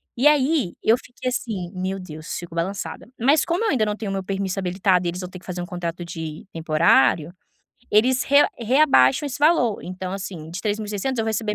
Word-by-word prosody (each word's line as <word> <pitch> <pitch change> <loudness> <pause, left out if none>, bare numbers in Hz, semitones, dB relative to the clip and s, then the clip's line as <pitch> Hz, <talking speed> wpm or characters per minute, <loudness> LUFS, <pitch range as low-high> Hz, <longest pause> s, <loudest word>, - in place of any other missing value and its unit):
e 260 +5 +4
aí 285 - +2
eu 225 - +5
fiquei 250 0 -6
assim: 200 -8 -4
"Meu 190 +1 -3
Deus, 155 -2 -7
fico 175 -1 -8
balançada". 185 +6 -4
Mas 280 +6 +4
como 345 +6 0
eu - - +2
ainda 240 -7 +2
não 210 0 -1
tenho 210 -3 -5
o - - -2
meu 195 -1 -2
permiso 195 0 -2
habilitado 185 -1 +1
e - - +1
eles 180 +2 -5
vão 180 - -6
ter 180 - -10
que - - -20
fazer 180 -1 -5
um - - -4
contrato 175 -1 -5
de 160 -2 -7
temporário, 160 -1 +3 0.6
eles 250 +5 +3
re 280 - +2 0.2
reabaixam 250 - +4
esse 280 - -5
valor. 290 -8 +3
Então, 185 0 -6
assim, 180 -5 -6
de 180 - -5
3600 215 +3 -2
eu 225 - 0
receber 220 -1 -1
195 Hz, 210 wpm, -23 LUFS, 175-240 Hz, 0.6 s, eu